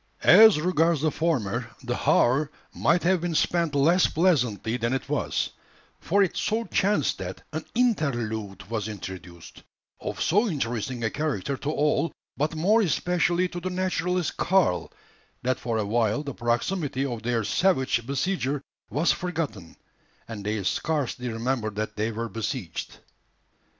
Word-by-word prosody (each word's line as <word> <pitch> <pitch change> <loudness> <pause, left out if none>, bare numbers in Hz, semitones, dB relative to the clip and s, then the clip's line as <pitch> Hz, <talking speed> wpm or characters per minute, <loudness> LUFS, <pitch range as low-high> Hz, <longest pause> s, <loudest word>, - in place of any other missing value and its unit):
As 220 -6 +8
regards 165 -2 +2
the 155 0 +2
former, 125 -8 -1
the 120 -1 -2
hour 140 +5 +3 0.2
might 175 - +2
have 180 0 +3
been 175 -1 -2
spent 170 -2 +1
less 165 +6 +4
pleasantly 125 - +1
than 120 0 -1
it 135 - -2
was; - - -1 0.5
for 200 +3 +3
it 185 - -1
so 225 +2 0
chanced 195 - +1
that 95 0 -6
an 155 +1 -4
interlude 120 - -1
was 110 -1 -2
introduced, 90 -4 -9 0.4
of - - -5
so 205 +9 +3
interesting 120 - -2
a 110 - 0
character 140 -4 -2
to 145 - -4
all, 150 +1 +1 0.2
but 150 +3 -1
more 205 +8 +3
especially 180 0 +1
to 175 - -5
the 185 +2 -3
naturalist 180 -2 -1
Karl, 185 - +2 0.5
that 130 0 0
for 115 -3 -2
a 110 - 0
while 115 +5 +1
the 140 -2 -5
proximity 130 +4 -1
of 120 -4 -4
their 115 -1 0
savage 130 - +2
besieger 140 -1 -1 0.3
was 160 +4 +2
forgotten, 150 - -4 0.5
and 110 -3 -7
they 105 0 -2
scarcely 130 - -1
remembered 115 -2 -2
that 110 0 -3
they 110 +2 -1
were 115 +1 -3
besieged. 110 - -4
140 Hz, 145 wpm, -26 LUFS, 115-170 Hz, 0.5 s, As